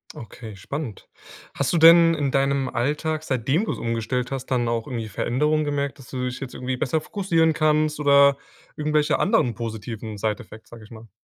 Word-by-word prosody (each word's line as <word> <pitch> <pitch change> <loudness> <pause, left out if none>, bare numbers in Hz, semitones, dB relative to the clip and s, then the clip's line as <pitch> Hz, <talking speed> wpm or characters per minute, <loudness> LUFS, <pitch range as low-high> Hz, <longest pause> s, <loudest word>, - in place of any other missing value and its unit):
Okay, 110 -2 -10
spannend. 120 - -7 0.5
Hast - - -1
du 175 - +1
denn 165 +1 +7
in 145 -3 -1
deinem 135 0 +1
Alltag, 150 +6 -1
seitdem 135 - 0
du - - -2
es - - -7
umgestellt 115 +2 -2
hast, 135 -1 -4
dann 125 -3 0
auch 115 -1 -2
irgendwie 115 -4 -4
Veränderungen 150 +9 0
gemerkt, 140 -1 -2
dass 125 - -14
du 125 -1 -3
dich 125 0 -4
jetzt 135 -2 -7
irgendwie 130 0 -3
besser 145 +5 0
fokussieren 165 -2 +1
kannst 155 -1 +1
oder 140 -1 +5 0.4
irgendwelche 150 -1 +1
anderen 140 - +2
positiven 110 -2 -6
Side-Effects, 110 +1 -5
sage 115 -1 -11
ich 105 - -15
mal? 115 -1 -13
135 Hz, 180 wpm, -23 LUFS, 115-150 Hz, 0.5 s, denn